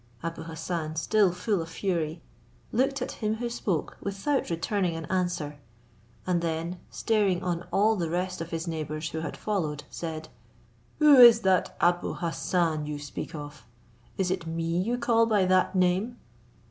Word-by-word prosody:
Abou 165 Hz, 0 st, -4 dB
Hassan, 160 Hz, -1 st, -4 dB
still 195 Hz, +4 st, +3 dB
full 180 Hz, +2 st, -1 dB
of 165 Hz, -, -6 dB
fury, 165 Hz, -3 st, -2 dB, 0.5 s
looked 270 Hz, +2 st, +1 dB
at -, -, -4 dB
him 215 Hz, -1 st, -2 dB
who 235 Hz, +1 st, -3 dB
spoke 185 Hz, -9 st, -2 dB
without 200 Hz, +9 st, -1 dB
returning 175 Hz, +1 st, 0 dB
an 165 Hz, 0 st, -5 dB
answer; 175 Hz, -6 st, -1 dB, 0.7 s
and 180 Hz, -2 st, +1 dB
then 165 Hz, +2 st, -2 dB
staring 205 Hz, -5 st, +1 dB
on 175 Hz, -1 st, -2 dB
all 215 Hz, +2 st, +3 dB
the 170 Hz, -5 st, -2 dB
rest 180 Hz, +1 st, -2 dB
of 165 Hz, -, -5 dB
his 165 Hz, +1 st, -4 dB
neighbours 155 Hz, -1 st, -3 dB
who 160 Hz, -, -4 dB
had 160 Hz, -2 st, -5 dB
followed, 155 Hz, -9 st, -2 dB
said, 160 Hz, -2 st, -5 dB, 0.7 s
"Who 300 Hz, -2 st, +7 dB
is 235 Hz, -2 st, +9 dB
that 190 Hz, -2 st, +1 dB
Abou 175 Hz, 0 st, +2 dB
Hassan 165 Hz, -2 st, -1 dB
you 150 Hz, -1 st, -3 dB
speak 145 Hz, +2 st, -6 dB
of? 145 Hz, -4 st, -8 dB, 0.5 s
Is 185 Hz, -2 st, 0 dB
it 180 Hz, -3 st, -2 dB
me 165 Hz, +1 st, -1 dB
you 235 Hz, +6 st, -1 dB
call 230 Hz, -1 st, +3 dB
by 210 Hz, -4 st, +3 dB
that 185 Hz, +1 st, +2 dB
name?" 185 Hz, +6 st, +1 dB
175 Hz, 160 wpm, -27 LUFS, 165-205 Hz, 0.7 s, is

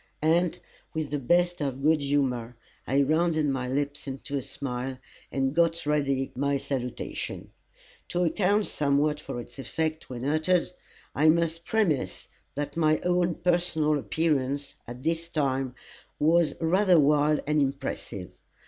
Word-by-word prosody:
And, 170 Hz, +2 st, +3 dB, 0.4 s
with 155 Hz, -2 st, -2 dB
the 145 Hz, -, 0 dB
best 175 Hz, +5 st, +2 dB
of 135 Hz, -1 st, -2 dB
good 155 Hz, 0 st, +4 dB
humour, 130 Hz, -4 st, 0 dB, 0.3 s
I 140 Hz, +2 st, +3 dB
rounded 155 Hz, +1 st, +2 dB
my 135 Hz, -2 st, -1 dB
lips 145 Hz, +2 st, -2 dB
into 135 Hz, +1 st, -5 dB
a 140 Hz, -, 0 dB
smile, 130 Hz, 0 st, -4 dB, 0.3 s
and 135 Hz, 0 st, 0 dB
got 170 Hz, 0 st, +2 dB
ready 140 Hz, -3 st, 0 dB
my 140 Hz, +2 st, +1 dB
salutation. 130 Hz, -3 st, -4 dB, 0.6 s
To 180 Hz, 0 st, 0 dB
account 200 Hz, +4 st, +2 dB
somewhat 145 Hz, +1 st, +1 dB
for 135 Hz, -, -6 dB
its 120 Hz, -, -10 dB
effect 160 Hz, +3 st, -3 dB
when 125 Hz, 0 st, -5 dB
uttered, 155 Hz, +5 st, +2 dB, 0.4 s
I 155 Hz, +2 st, +4 dB
must 165 Hz, 0 st, +1 dB
premise 155 Hz, -, 0 dB, 0.3 s
that 145 Hz, +1 st, -3 dB
my 155 Hz, -2 st, +3 dB
own 180 Hz, -1 st, +1 dB
personal 170 Hz, -4 st, +1 dB
appearance, 140 Hz, -2 st, 0 dB
at 120 Hz, +2 st, -8 dB
this 165 Hz, +1 st, -1 dB
time, 135 Hz, -5 st, -1 dB, 0.4 s
was 165 Hz, +1 st, +3 dB
rather 180 Hz, +2 st, +4 dB
wild 150 Hz, +1 st, +3 dB
and 150 Hz, 0 st, +2 dB
impressive. 140 Hz, 0 st, -3 dB
150 Hz, 140 wpm, -27 LUFS, 135-165 Hz, 0.6 s, good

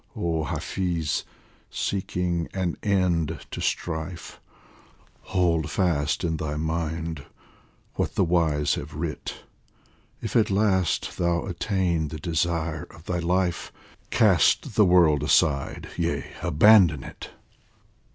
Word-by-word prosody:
Oh 80 Hz, -2 st, -1 dB
Hafiz, 85 Hz, 0 st, -2 dB, 0.4 s
seeking 90 Hz, -3 st, -2 dB
an 90 Hz, -3 st, -1 dB
end 85 Hz, -6 st, +1 dB
to -, -, -5 dB
strife, 85 Hz, +1 st, -4 dB, 0.8 s
Hold 85 Hz, -4 st, +1 dB
fast 80 Hz, -5 st, 0 dB
in 80 Hz, -2 st, 0 dB
thy 75 Hz, -1 st, -3 dB
mind 80 Hz, -1 st, -3 dB, 0.7 s
what -, -, -2 dB
the -, -, +3 dB
wise 80 Hz, -4 st, +2 dB
have 75 Hz, +1 st, -5 dB
writ: 80 Hz, 0 st, -5 dB, 0.4 s
" -, -, -35 dB
If -, -, -4 dB
at 110 Hz, -3 st, +4 dB
last 95 Hz, -4 st, +1 dB
thou 85 Hz, -1 st, +1 dB
attain 90 Hz, -3 st, -1 dB
the 80 Hz, -, -6 dB
desire 80 Hz, 0 st, -1 dB
of 80 Hz, -, -16 dB
thy 90 Hz, -1 st, -2 dB
life, 90 Hz, 0 st, 0 dB, 0.4 s
Cast -, -, +3 dB
the 105 Hz, -, +5 dB
world 85 Hz, -5 st, +5 dB
aside, 70 Hz, 0 st, +1 dB
yea, -, -, -1 dB, 0.2 s
abandon 85 Hz, -2 st, +5 dB
it -, -, -9 dB
85 Hz, 115 wpm, -25 LUFS, 80-90 Hz, 0.8 s, the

